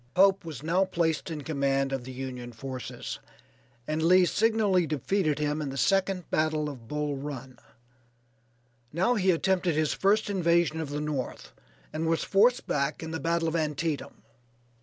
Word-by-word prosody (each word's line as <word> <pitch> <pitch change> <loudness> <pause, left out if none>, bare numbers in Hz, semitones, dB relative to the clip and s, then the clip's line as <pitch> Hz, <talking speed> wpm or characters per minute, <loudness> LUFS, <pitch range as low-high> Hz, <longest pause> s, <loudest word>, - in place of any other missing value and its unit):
Pope 195 +1 +5
was 155 -5 -7
now 175 +4 +2
placed 170 -4 -1
in 155 -3 -5
command 135 -2 0
of 130 -2 -3
the 130 - -7
Union 125 -2 -6
forces, 130 +2 -6 0.7
and 155 +1 -1
Lee 180 +3 +6
signally 210 -4 +2
defeated 155 +2 0
him 150 0 -1
in 145 - -3
the 135 - -6
second 195 +1 +1
battle 155 -1 +1
of 125 -6 -10
Bull 150 +1 -2
Run. 135 -2 -7 1.3
Now 185 +10 +2
he 190 -5 +1
attempted 180 -1 +2
his 155 -1 +1
first 205 +3 +2
invasion 170 -4 +2
of 155 - -4
the 145 +1 -3
North, 150 -4 -4 0.4
and 160 +1 -1
was 165 0 +1
forced 235 +6 +3
back 140 +2 -1
in 160 - -5
the 160 - -3
battle 165 0 0
of 160 - -1
Antietam. 155 -5 -2
160 Hz, 160 wpm, -28 LUFS, 145-180 Hz, 1.3 s, Lee